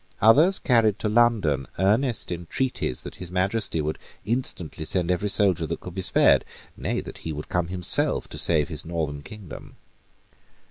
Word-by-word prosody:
Others 150 - +5
carried 115 -5 +2
to 110 - -2
London 105 - +2
earnest 110 +4 +1
entreaties 85 - -2
that - - -10
His 90 -1 -8
Majesty 95 -1 0
would 75 +1 -3 0.3
instantly 105 -9 -1
send 90 +2 +1
every 90 +3 0
soldier 95 -5 +2
that - - -4
could 90 - -9
be 95 - -4
spared, 100 +2 +4 0.3
nay, - - -3
that - - -10
he 80 - -5
would 75 0 -7
come 90 -1 -1
himself 90 -1 +1
to - - -5
save 75 -4 +2
his - - -4
northern 80 -4 -4
kingdom. 95 -3 -11
90 Hz, 165 wpm, -24 LUFS, 80-110 Hz, 0.3 s, Others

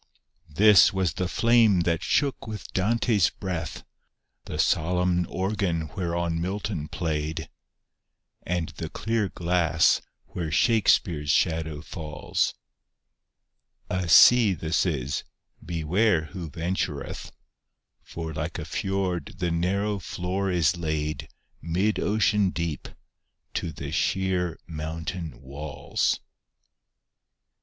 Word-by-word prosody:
This 100 +6 +6
was 95 -5 0
the 90 +2 -2
flame 115 -3 +4
that 85 0 0
shook 140 +1 0
with 110 -2 -7
Dante's 110 0 +2
breath; 90 -5 -5 0.6
The 75 - -5
solenm 90 +2 +1
organ 95 -5 -1
whereon 85 -2 -1
Milton 95 -3 -3
played, 80 -2 -3 0.9
And 85 -2 -2
the - - -6
clear 110 -3 -1
glass 85 -2 +2 0.2
where 80 -3 -5
Shakespeare's 80 - +3
shadow 80 -2 +1
falls: 75 -3 -2 1.4
A 90 -2 -1
sea 110 +2 +7
this 80 +2 0
is 70 -4 -2 0.2
— - - -54
beware 85 +3 +1
who 85 -4 -5
ventureth 80 -3 -3
I - - -15 0.7
For 80 -1 -6
like 80 +1 -4
a 80 - -5
fjord 95 -1 -2
the 90 -2 -1
narrow 100 +5 0
floor 95 +3 -2
b 90 -2 0
laid 80 -2 -3 0.3
Mid 95 +6 0
ocean 105 -2 +2
deep 85 -5 -3 0.7
to 85 - -2
the 70 -1 -7
sheer 90 +2 0
mountain 80 0 -5
walls. 70 +1 -2
85 Hz, 105 wpm, -26 LUFS, 80-95 Hz, 1.4 s, sea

